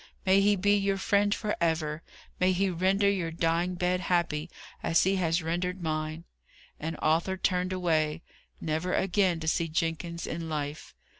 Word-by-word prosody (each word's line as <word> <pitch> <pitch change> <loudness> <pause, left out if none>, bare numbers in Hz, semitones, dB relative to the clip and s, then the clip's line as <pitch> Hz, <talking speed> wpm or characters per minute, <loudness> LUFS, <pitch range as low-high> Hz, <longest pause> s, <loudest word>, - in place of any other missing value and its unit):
"May 190 +1 +5
He 205 +1 +4
be 205 +2 +3
your 195 -1 +1
friend 205 +1 +2
for 210 0 -1
ever! 160 -2 0 0.4
May 185 +1 +3
He 190 +1 +1
render 190 +3 +2
your 190 -4 +1
dying 165 +2 0
bed 180 +1 0
happy, 170 -3 0 0.3
as 165 - +3
He 190 +1 +2
has 170 -1 +1
rendered 180 +2 -2
mine!" 155 0 -2 0.6
And 160 +1 -4
Arthur 165 +4 +2
turned 180 0 0
away 165 -3 0 0.4
never 160 +3 -1
again 190 -2 +2
to 160 - -4
see 165 +1 +1
Jenkins 165 +1 -2
in 165 0 -4
life. 150 -1 -4
175 Hz, 160 wpm, -28 LUFS, 160-190 Hz, 0.6 s, May